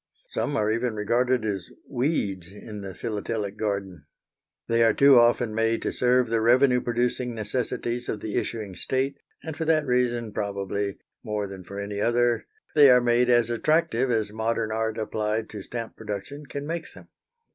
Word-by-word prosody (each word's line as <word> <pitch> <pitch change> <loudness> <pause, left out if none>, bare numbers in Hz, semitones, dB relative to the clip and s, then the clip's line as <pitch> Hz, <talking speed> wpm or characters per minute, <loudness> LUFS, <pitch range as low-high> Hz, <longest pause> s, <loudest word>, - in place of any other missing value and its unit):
Some 145 - -2
are 105 -2 +1
even 115 0 -1
regarded 120 +3 +1
as 100 -4 -2 0.2
weeds 105 - -1
in 105 0 -9
the 95 -2 -7
philatelic 105 -2 -3
garden. 100 -8 -3 0.6
They 115 0 +2
are 115 - +4
too 140 -2 +7
often 120 -1 +3
made 115 +1 +1
to - - -1
serve 125 0 +3
the 115 -1 +1
revenue 125 +2 +4
producing 120 0 -1
necessities 120 +2 -3
of 105 - -2
the 105 +1 -5
issuing 105 -5 -3
state, 135 +5 -1 0.2
and 160 -2 -5
for 160 - -3
that 155 -1 +3
reason 120 -3 0
probably, 100 -1 -2 0.3
more 105 -3 -2
than 95 -1 -8
for 100 +3 -8
any 100 0 -4
other, 120 +1 +2 0.3
they 145 -2 +8
are 125 -1 +7
made 120 0 +2
as 120 -1 +4
attractive 135 0 +1
as 110 -3 0
modern 110 0 -1
art 110 0 -1
applied 110 0 -2
to 105 - -6
stamp 115 +3 -6
production 140 +9 -6
can 140 +1 -5
make 165 +1 -4
them. - - -15
115 Hz, 170 wpm, -26 LUFS, 105-125 Hz, 0.6 s, they